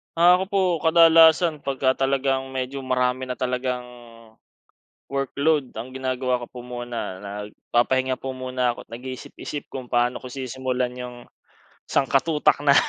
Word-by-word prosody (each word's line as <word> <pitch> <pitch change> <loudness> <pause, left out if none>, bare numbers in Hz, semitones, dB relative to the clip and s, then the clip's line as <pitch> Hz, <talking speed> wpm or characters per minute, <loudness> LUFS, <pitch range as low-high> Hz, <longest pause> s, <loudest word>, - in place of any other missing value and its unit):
Ah 175 +2 +7
ako 185 - 0
po, 200 - +2 0.2
kadalasan 165 -1 +6
pagka 130 -1 +1
talagang 135 0 0
medyo 130 +1 -4
marami 130 0 0
na 125 -1 -4
talagang, 125 0 -1 1.3
workload 140 +1 0
ang 120 +4 -6
ginagawa 130 -1 -1
ko 120 - -6
po 125 - -11
muna 120 -6 -5
nagpapahinga 120 +6 -1
po 135 0 -5
muna 130 -1 -1
ako, - - -12
nag-iisip-isip 130 +4 -7
kung 130 -1 -5
paano 120 +1 +1
ko 130 - -8
sisimulan 130 -1 -2
'yang 125 -1 -6 0.7
sangkutak 145 +3 +2
na 140 -1 +5
130 Hz, 130 wpm, -24 LUFS, 125-140 Hz, 1.3 s, Ah